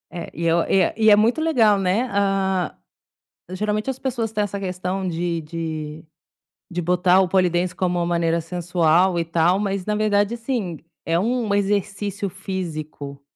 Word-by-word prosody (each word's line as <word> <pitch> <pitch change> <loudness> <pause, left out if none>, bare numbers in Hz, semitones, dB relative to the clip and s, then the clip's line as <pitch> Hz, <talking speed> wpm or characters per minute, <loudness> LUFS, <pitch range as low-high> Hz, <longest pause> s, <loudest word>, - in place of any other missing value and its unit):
É, 170 -1 -6
e 170 - -4
eu 170 +1 +3
e 195 - +4
é 175 - +1
e 220 -1 +5
é 210 - +8
muito 225 +7 +2
legal, 235 -11 +3
né. 195 +7 +1
Ah, 195 -3 0 0.8
geralmente 210 +4 -2
as 265 -1 -2
pessoas 235 -5 -2
têm 210 -1 0
essa 200 -1 -3
questão 185 0 -3
de 170 -1 -2
de 155 -1 -5 0.6
de 175 0 -3
botar 180 +2 +3
o 190 - +2
pole 185 0 +3
dance 175 +1 -1
como 180 -1 0
uma 170 - 0
maneira 170 -1 +1
sensual, 175 +1 +2
e - - 0
tal, 170 +3 +2
mas 195 -2 -2
na 210 - 0
verdade, 210 0 +1
assim, 230 - -3 0.3
é 165 - +1
um 225 +2 0
exercício 200 0 -1
físico. 155 -7 -6
185 Hz, 170 wpm, -22 LUFS, 170-205 Hz, 0.8 s, é